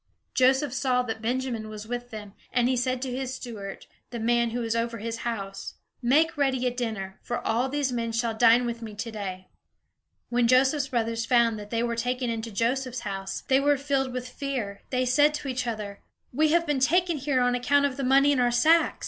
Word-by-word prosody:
Joseph 265 Hz, +1 st, +3 dB
saw 255 Hz, -2 st, +1 dB
that 225 Hz, -2 st, -5 dB
Benjamin 240 Hz, -2 st, -2 dB
was 215 Hz, 0 st, -8 dB
with 245 Hz, +1 st, -4 dB
them, 210 Hz, -3 st, -9 dB, 0.2 s
and 245 Hz, 0 st, +2 dB
he 260 Hz, -, +2 dB
said 255 Hz, +1 st, -1 dB
to 255 Hz, -2 st, -3 dB
his 260 Hz, 0 st, -3 dB
steward, 205 Hz, -5 st, -8 dB, 0.2 s
the 240 Hz, -, -6 dB
man 235 Hz, +1 st, +2 dB
who 240 Hz, +2 st, -3 dB
was 230 Hz, 0 st, -1 dB
over 230 Hz, 0 st, -1 dB
his 230 Hz, +2 st, -4 dB
house: 195 Hz, -5 st, -5 dB, 0.3 s
"Make 300 Hz, +7 st, +3 dB
ready 265 Hz, -3 st, +1 dB
a 250 Hz, -, +2 dB
dinner, 220 Hz, -6 st, -4 dB
for 240 Hz, -, -3 dB
all 240 Hz, +4 st, +1 dB
these 285 Hz, -1 st, -1 dB
men 230 Hz, -1 st, -2 dB
shall 230 Hz, 0 st, 0 dB
dine 235 Hz, +2 st, +5 dB
with 235 Hz, 0 st, -4 dB
me 220 Hz, -2 st, -7 dB
today." 205 Hz, -4 st, -6 dB, 0.8 s
When 240 Hz, -1 st, +2 dB
Joseph's 265 Hz, +3 st, +3 dB
brothers 230 Hz, -2 st, -1 dB
found 235 Hz, -3 st, +3 dB
that 205 Hz, 0 st, -9 dB
they 230 Hz, +1 st, 0 dB
were 235 Hz, -1 st, -1 dB
taken 245 Hz, +1 st, -1 dB
into 230 Hz, 0 st, -4 dB
Joseph's 245 Hz, +3 st, -1 dB
house, 195 Hz, -2 st, -4 dB
they 265 Hz, 0 st, +4 dB
were 285 Hz, +1 st, +3 dB
filled 270 Hz, -1 st, -1 dB
with 250 Hz, 0 st, -4 dB
fear. 250 Hz, -7 st, -4 dB
They 255 Hz, -1 st, 0 dB
said 290 Hz, +4 st, +4 dB
to 295 Hz, -, -5 dB
each 255 Hz, -1 st, -2 dB
other: 210 Hz, -3 st, -4 dB, 0.3 s
"We 310 Hz, +5 st, +3 dB
have 335 Hz, +2 st, +3 dB
been 295 Hz, -4 st, 0 dB
taken 345 Hz, +4 st, +2 dB
here 275 Hz, -1 st, 0 dB
on 245 Hz, 0 st, +2 dB
account 285 Hz, +3 st, +2 dB
of 275 Hz, -2 st, -1 dB
the 275 Hz, -, -4 dB
money 275 Hz, +2 st, +5 dB
in 280 Hz, -, +2 dB
our 245 Hz, -1 st, +3 dB
sacks. 310 Hz, +8 st, +3 dB
245 Hz, 210 wpm, -26 LUFS, 230-265 Hz, 0.8 s, dine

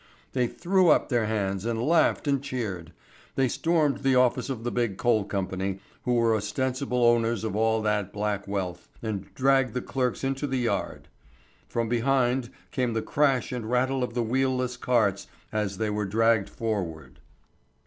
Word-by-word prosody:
They 125 Hz, -2 st, +2 dB
threw 185 Hz, +5 st, +2 dB
up -, -, +4 dB
their 120 Hz, -4 st, +1 dB
hands 100 Hz, -3 st, -1 dB
and 115 Hz, 0 st, -1 dB
laughed 155 Hz, +4 st, +2 dB
and 140 Hz, -2 st, +2 dB
cheered. 105 Hz, -, -4 dB, 0.4 s
They 135 Hz, -1 st, +3 dB
stormed 155 Hz, +2 st, +1 dB
the 135 Hz, -1 st, +2 dB
office 125 Hz, 0 st, +3 dB
of 120 Hz, -4 st, -4 dB
the 120 Hz, -, -2 dB
big 120 Hz, -6 st, -1 dB
coal 115 Hz, -4 st, +2 dB
company, 95 Hz, -1 st, -3 dB, 0.3 s
who 125 Hz, -1 st, +2 dB
were 115 Hz, -1 st, +3 dB
ostensible 125 Hz, +4 st, -1 dB
owners 115 Hz, -2 st, +3 dB
of 110 Hz, -3 st, -2 dB
all 110 Hz, 0 st, +2 dB
that 105 Hz, -2 st, 0 dB
black 105 Hz, -1 st, -2 dB
wealth, 95 Hz, -3 st, -4 dB
and 105 Hz, -4 st, -4 dB
dragged 135 Hz, -2 st, +2 dB
the 125 Hz, -, 0 dB
clerks 125 Hz, -1 st, -2 dB
into 135 Hz, +2 st, -1 dB
the 135 Hz, -1 st, -1 dB
yard. 120 Hz, -2 st, -2 dB, 0.6 s
From 115 Hz, -1 st, -1 dB
behind 125 Hz, +1 st, +1 dB, 0.2 s
came 125 Hz, -3 st, 0 dB
the 110 Hz, -, -1 dB
crash 140 Hz, -4 st, +1 dB
and 120 Hz, -3 st, -4 dB
rattle 130 Hz, +2 st, +1 dB
of 125 Hz, -1 st, -4 dB
the 120 Hz, -, +1 dB
wheel 130 Hz, +3 st, +1 dB
less 125 Hz, 0 st, -2 dB
carts 120 Hz, -6 st, +1 dB, 0.2 s
as 105 Hz, -3 st, -2 dB
they 110 Hz, -1 st, -1 dB
were 105 Hz, 0 st, -1 dB
dragged 115 Hz, 0 st, +2 dB
forward. 80 Hz, -, -4 dB
120 Hz, 170 wpm, -27 LUFS, 105-130 Hz, 0.6 s, up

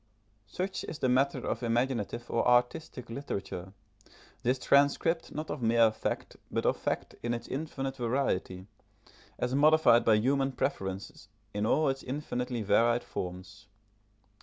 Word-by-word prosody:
Such 185 Hz, -, -3 dB
is 155 Hz, -, -6 dB
the 130 Hz, -, 0 dB
matter 130 Hz, +1 st, +2 dB
of 115 Hz, -, -2 dB
imaginative 120 Hz, -1 st, -1 dB
or 115 Hz, -, 0 dB
artistic 125 Hz, +2 st, +1 dB
literature 100 Hz, -7 st, -5 dB, 0.7 s
this 125 Hz, +2 st, +1 dB
transcript, 145 Hz, +5 st, +2 dB
not 155 Hz, +1 st, -5 dB
of 150 Hz, -, -4 dB
mere 115 Hz, -1 st, +4 dB
fact, 110 Hz, -, -4 dB
but -, -, -2 dB
of -, -, +2 dB
fact -, -, -3 dB
in 120 Hz, 0 st, -1 dB
its 115 Hz, -, -7 dB
infinite 135 Hz, -2 st, -4 dB
variety, 115 Hz, -7 st, -1 dB, 0.7 s
as 125 Hz, 0 st, -1 dB
modified 145 Hz, -4 st, +5 dB
by 110 Hz, -, +5 dB
human 135 Hz, +4 st, +1 dB
preference 95 Hz, -3 st, -3 dB, 0.3 s
in 105 Hz, +1 st, 0 dB
all 155 Hz, +6 st, +3 dB
its 135 Hz, 0 st, -1 dB
infinitely 125 Hz, -3 st, -3 dB
varied 120 Hz, +3 st, +3 dB
forms. 95 Hz, +4 st, -7 dB
125 Hz, 135 wpm, -30 LUFS, 110-140 Hz, 0.7 s, modified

